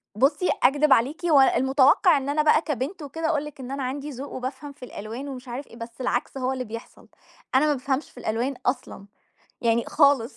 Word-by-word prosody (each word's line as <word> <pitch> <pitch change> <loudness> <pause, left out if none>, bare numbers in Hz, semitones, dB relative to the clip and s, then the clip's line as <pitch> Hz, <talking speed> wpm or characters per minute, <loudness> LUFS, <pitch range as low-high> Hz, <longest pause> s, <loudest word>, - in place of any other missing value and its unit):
بُصّي، 275 - +2
أكدِب 285 +3 +5
عليكِ 275 +9 +1
و 300 -5 +5
المتوقَّع 270 +6 +4
إن 275 0 -3
أنا 300 +2 +2
بقى 305 0 +4
كبنت 300 - -4
وكده، 315 +3 -4
أقول 300 -2 0
لِك 295 -2 -10
إن 260 0 -7
أنا 275 -1 -3
عَندي 280 +3 -4
ذوق 275 0 -7
وبافهَم 265 +3 -5
في 275 -2 -11
الألوان 230 +4 -7
ومش 260 -2 -8
عارف 250 +4 -6
إيه، - - -15
بس 230 +2 -9
العكْس 250 +2 -2
هو 260 0 -1
اللي 255 -1 -3
بيحصَل، 230 0 -10 0.5
أنا 285 +3 +5
ما 300 - +3
بافهمش 270 +1 -2
في - - -25
الألوان 235 +5 -1
أصلًا، 250 -5 -2 0.6
يعني 235 -1 +2
خالص، 280 -6 +3
270 Hz, 205 wpm, -25 LUFS, 250-290 Hz, 0.6 s, أكدِب